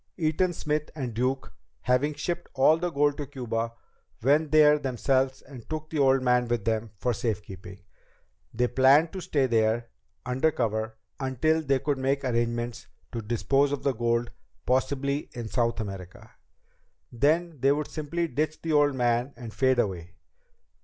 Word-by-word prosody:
Eaton 170 +2 +1
Smith 150 -2 -2
and 130 -6 -4
Duke, 130 +4 -2 0.3
having 135 +4 +1
shipped 170 +3 -4
all 145 +4 +5
the 175 +1 -1
gold 145 -2 +1
to 145 -2 -5
Cuba, 115 -4 -3 0.5
went 145 +4 +3
there 150 -1 +6
themselves 130 0 0
and 130 -5 -12
took 155 0 -5
the 155 - -1
old 135 -1 +4
man 125 -1 +3
with 120 -3 -1
them 110 0 -1
for 125 +5 0
safekeeping. 100 -3 -5 0.7
They 125 +2 +1
planned 135 +6 +4
to 190 - -5
stay 140 -5 +1
there, 115 -1 +1 0.3
under 130 +5 +2
cover, 110 -4 -2 0.2
until 140 +4 +1
they 135 -3 +2
could 140 +1 -1
make 135 +2 0
arrangements 120 -1 -2 0.2
to 115 - -4
dispose 135 +6 +1
of 145 - -3
the 140 - +2
gold, 120 +1 0 0.3
possibly 140 +2 0
in 120 -2 -5
South 115 -1 0
America. 95 -4 -7 0.8
Then 155 +6 +1
they 135 +2 +4
would 150 +1 0
simply 170 +2 -3
ditch 155 +2 -2
the 165 -1 -1
old 145 -2 +4
man 120 +2 0
and 115 -3 -8
fade 130 -1 +2
away. 90 -6 -2
130 Hz, 160 wpm, -27 LUFS, 120-145 Hz, 0.8 s, there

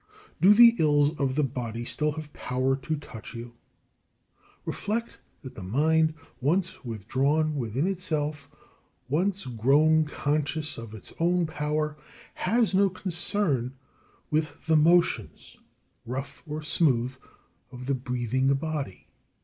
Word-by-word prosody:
Do 200 +3 +7
the 235 +1 +8
ills 145 0 +3
of 135 -2 0
the 150 - +2
body 120 -3 -3
still 150 +4 +1
have 155 -1 -8
power 130 +1 0
to 150 +3 -3
touch 125 -5 -10
you? 120 +1 -8 1.1
Reflect 230 +3 -3 0.2
that 130 - -8
the - - -9
mind, 155 +10 +2 0.2
once 170 +7 0
withdrawn 135 +8 0
within 130 +2 -1
itself, 155 -6 -2 0.6
once 185 +7 0
grown 145 +7 +3
conscious 150 0 -2
of 115 -1 -8
its 110 - -10
own 175 +1 +2
power, 150 -1 -2 0.4
has 230 -3 +1
no 195 +1 +4
concern 175 - -1 0.6
with 155 0 -1
the 160 0 +3
motions, 170 +3 +2 0.5
rough 135 +3 -5
or 155 +1 -4
smooth, 130 -6 +1 0.6
of 125 0 -8
the 140 - 0
breathing 130 0 0
body. 145 - -4
150 Hz, 125 wpm, -27 LUFS, 130-160 Hz, 1.1 s, the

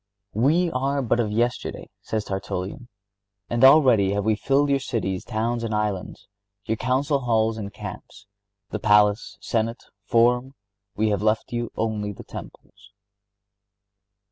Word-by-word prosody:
(63) 110 - -2
"We 165 +5 +3
are 135 +1 0
but 120 0 +1
of 110 -3 +1
yesterday," 120 +3 -1
says 110 -1 -3
Tertullian, 95 +5 -4 0.6
"and 120 +2 +1
already 130 -9 +6
have 100 0 -1
we 110 -1 +3
filled 140 +5 +1
your 140 - +3
cities, 95 -8 -3
towns, 115 +2 -2
islands, 105 -4 -3 0.4
your 110 0 -1
council 135 +4 +1
halls 115 -3 +1
and 100 -1 -5
camps... 105 - -9 0.5
the - - -3
palace, 105 0 +3
senate, 115 +1 -2 0.2
forum; 125 +3 +2 0.4
we 110 +1 +1
have 100 -2 0
left 110 +2 0
you 120 -1 -2
only 105 -2 -2
the 100 - -10
temples." 100 0 -12
115 Hz, 140 wpm, -24 LUFS, 105-130 Hz, 0.6 s, already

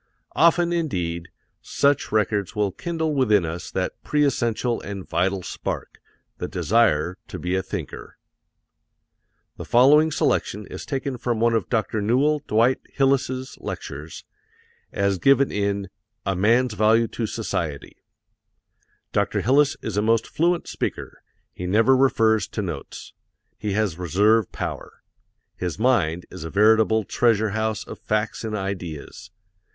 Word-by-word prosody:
Often, 170 +1 +4
indeed, 90 - -2 0.3
such 140 0 +1
records 105 -2 0
will 105 -2 +1
kindle 160 - -2
within 105 - +3
us 80 +1 -5
that - - -3
pre 150 -1 +2
essential 120 -2 0
and 100 -2 -7
vital 90 +3 0
spark, - - -5 0.4
the - - -3
desire 90 -6 +1
to - - -7
be 90 +1 -3
a 95 - +1
thinker. 95 -5 -7 1.4
The - - -6
following 145 +6 +5
selection 105 -7 0
is - - -9
taken 135 -2 -3
from 120 -2 -1
one 115 +1 +3
of 115 - 0
Dr. 110 -2 0
Newell 135 +8 +2
Dwight 115 +4 +3
Hillis's 130 -1 0
lectures, 75 +3 -7 0.7
as 100 -1 0
given 135 +3 +4
in 100 -1 -1 0.4
"A 95 -1 0
Man's 115 +5 +3
Value 110 +2 +3
to 115 - -3
Society." 85 -10 -4 1.2
Dr. - - +1
Hillis 140 +4 +3
is 105 -3 -3
a - - +3
most 115 +1 +2
fluent 170 +1 0
speaker - - -5 0.3
he 90 - -5
never 115 +7 +4
refers 115 -5 +3
to 105 - -4
notes. 80 -7 -7 0.5
He 105 -2 -2
has 100 -5 -1
reserve 100 +5 +2
power. - - -6 0.5
His 90 -2 -3
mind 100 -8 +1
is - - -8
a 80 - -5
veritable 110 +2 +4
treasure 110 -1 +1
house 110 0 -1
of - - -9
facts 110 +1 -2
and 110 -1 -3
ideas. 90 -6 -6
110 Hz, 135 wpm, -23 LUFS, 95-130 Hz, 1.4 s, following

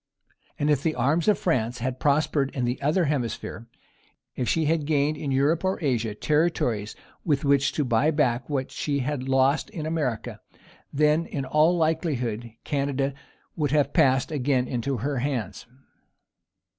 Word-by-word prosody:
And 145 +1 +1
if 145 -2 +2
the 160 0 0
arms 140 - +1
of 210 - +4
France 120 -8 0
had 125 +1 -3
prospered 145 -1 +1
in 125 -3 0
the 125 +1 -2
other 155 +5 +2
hemisphere; 120 -4 -3 0.7
if 125 - -2
she 160 -1 +1
had 155 -1 0
gained 150 0 +2
in 150 -1 -5
Europe 145 +6 +2
or 190 0 0
Asia 120 -8 -1
territories 125 -8 0 0.3
with 145 -3 0
which 140 0 +3
to 150 - 0
buy 125 +5 +2
back 135 -5 0
what 135 -3 -2
she 140 -2 -2
had 135 -1 -3
lost 135 +7 +2
in 170 -8 -6
America, 150 -9 -3 0.5
then, 150 +3 +2
in 140 -3 -4
all 155 +6 +3
likelihood, 135 -9 -1
Canada 140 -1 -1 0.4
would 150 -3 0
have 145 0 +1
passed 130 +2 +3
again 130 -3 +1
into 130 +2 -2
her 135 +3 -2
hands. 120 -7 -3
140 Hz, 155 wpm, -25 LUFS, 125-155 Hz, 0.7 s, of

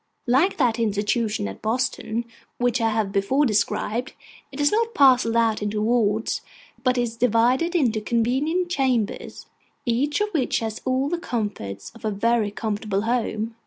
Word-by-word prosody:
Like 275 +10 +2
that 240 -5 +2
institution 210 - 0
at 95 - -8
Boston, 235 0 -1 0.3
which 245 0 +1
I 225 - +3
have 215 -3 -1
before 210 +9 +2
described, 225 +1 0 0.4
it 270 - -9
is 290 0 +3
not 455 +1 0
parcelled 255 -4 +5
out 225 -2 +2
into 210 0 -2
wards, 220 -1 +1 0.4
but 255 -1 +2
is 240 -2 -1
divided 250 - +2
into 235 -9 +2
convenient 265 +11 0
chambers, 255 - -1 0.4
each 265 +5 +1
of 420 0 0
which 305 -10 0
has 220 -1 -4
all 260 +1 +1
the 345 +3 -2
comforts 205 - -4
of 230 - -16
a 215 - 0
very 220 +1 +1
comfortable 210 -1 -2
home. 225 -1 -1
235 Hz, 155 wpm, -23 LUFS, 215-260 Hz, 0.4 s, parcelled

